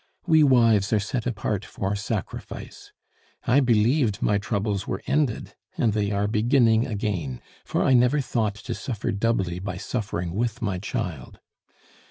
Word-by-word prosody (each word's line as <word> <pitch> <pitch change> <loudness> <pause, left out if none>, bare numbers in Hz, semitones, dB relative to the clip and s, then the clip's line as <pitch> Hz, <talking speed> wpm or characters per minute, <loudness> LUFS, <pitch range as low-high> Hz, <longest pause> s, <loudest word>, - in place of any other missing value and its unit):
We 160 -3 +5
wives 115 -8 +4
are 110 - +4
set 110 +4 -3
apart 105 -3 -2
for 100 +1 -3
sacrifice. 105 -1 -6 0.5
I 125 +3 +4
believed 120 -2 +2
my 100 -1 +2
troubles 100 -1 -2
were - - -3
ended, 140 -6 0 0.2
and 110 -3 +2
they 105 -1 0
are 100 0 0
beginning 115 +1 +3
again, 100 - -3 0.2
for - - -1
I 130 - +4
never 125 +4 +4
thought 110 -6 -1
to - - -6
suffer 115 -6 -3
doubly 100 -5 0
by 100 +3 -5
suffering 90 -7 -3
with 115 +3 -1
my 100 -6 -2
child. 85 - -5
110 Hz, 150 wpm, -25 LUFS, 100-120 Hz, 0.5 s, We